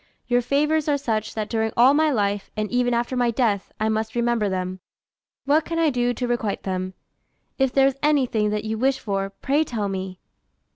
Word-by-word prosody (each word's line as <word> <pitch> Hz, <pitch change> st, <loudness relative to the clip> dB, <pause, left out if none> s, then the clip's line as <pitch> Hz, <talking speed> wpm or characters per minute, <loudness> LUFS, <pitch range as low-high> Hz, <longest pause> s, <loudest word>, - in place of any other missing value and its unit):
Your 245 Hz, 0 st, +2 dB
favours 300 Hz, +5 st, +1 dB
are 290 Hz, -, +3 dB
such, 220 Hz, -6 st, -2 dB
that 215 Hz, -1 st, -2 dB
during 220 Hz, -1 st, -1 dB
all 250 Hz, +4 st, +7 dB
my 310 Hz, +1 st, +3 dB
life, 205 Hz, -6 st, -1 dB
and 215 Hz, -1 st, -2 dB
even 245 Hz, 0 st, +1 dB
after 240 Hz, +2 st, 0 dB
my 245 Hz, -1 st, +2 dB
death, 225 Hz, -4 st, 0 dB
I 215 Hz, -, +1 dB
must 220 Hz, +1 st, -1 dB
remember 235 Hz, -3 st, +1 dB
them. 185 Hz, 0 st, -3 dB, 0.7 s
What 300 Hz, +3 st, +3 dB
can 330 Hz, +1 st, -4 dB
I 325 Hz, -2 st, +3 dB
do 245 Hz, -1 st, +1 dB
to 245 Hz, +1 st, -3 dB
requite 235 Hz, -4 st, -2 dB
them? 185 Hz, -1 st, -3 dB, 0.6 s
If 265 Hz, -1 st, +2 dB
there 270 Hz, +1 st, +4 dB
is 275 Hz, 0 st, 0 dB
anything 255 Hz, -8 st, +2 dB
that 210 Hz, 0 st, -2 dB
you 220 Hz, 0 st, -3 dB
wish 265 Hz, +2 st, +2 dB
for, 195 Hz, -2 st, -2 dB
pray 275 Hz, +9 st, 0 dB
tell 220 Hz, -8 st, -3 dB
me." 190 Hz, -1 st, -5 dB
235 Hz, 200 wpm, -23 LUFS, 210-270 Hz, 0.7 s, all